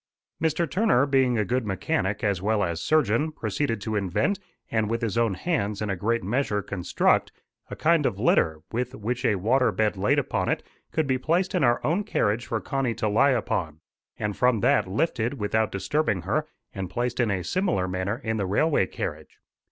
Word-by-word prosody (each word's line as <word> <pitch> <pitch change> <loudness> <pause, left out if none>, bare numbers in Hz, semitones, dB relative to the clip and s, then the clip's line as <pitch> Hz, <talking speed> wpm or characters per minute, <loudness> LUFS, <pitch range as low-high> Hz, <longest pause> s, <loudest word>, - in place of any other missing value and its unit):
Mr. 160 +1 +1
Turner, 160 - +3
being 130 -3 +2
a 105 - +1
good 125 +5 0
mechanic 100 - -1
as 100 -4 +1
well 105 +1 +1
as 85 -2 -2
surgeon, 150 -1 +2
proceeded 115 -2 -2
to 110 +2 -3
invent, 105 - 0 0.3
and 110 -2 +1
with 115 +1 -2
his 110 -4 -1
own 115 -4 +2
hands 105 - -1
in 105 -2 -2
a - - -1
great 115 +5 0
measure 105 -1 0
construct, 90 -3 +1 0.4
a - - -5
kind - - +3
of - - -3
litter, 80 -1 +2
which, 125 +2 -2
with 125 +4 -3
a 105 - +3
water 115 +5 +2
bed 105 +1 0
laid 100 +2 +2
upon - - 0
it, - - -1 0.3
could 160 - 0
be 130 -2 0
placed 175 +7 0
in 180 -5 +1
our 120 -2 +3
own 175 +7 +1
carriage 120 - 0
for 115 - -1
Connie 130 -3 -1
to 110 -1 -1
lie 110 +7 +4
upon, 90 - -1 0.4
and 105 -1 -2
from 125 -4 +2
that - - +3
lifted, 115 - -1
without 110 -2 0
disturbing 105 - 0
her, 150 - -1 0.3
and 95 -3 -4
placed 120 +6 -2
in 120 -3 +2
a 95 -3 -1
similar 170 - 0
manner 95 +5 -2
in 110 -1 -1
the 100 -3 -1
railway 105 - +2
carriage. - - -6
115 Hz, 195 wpm, -26 LUFS, 100-135 Hz, 0.4 s, lie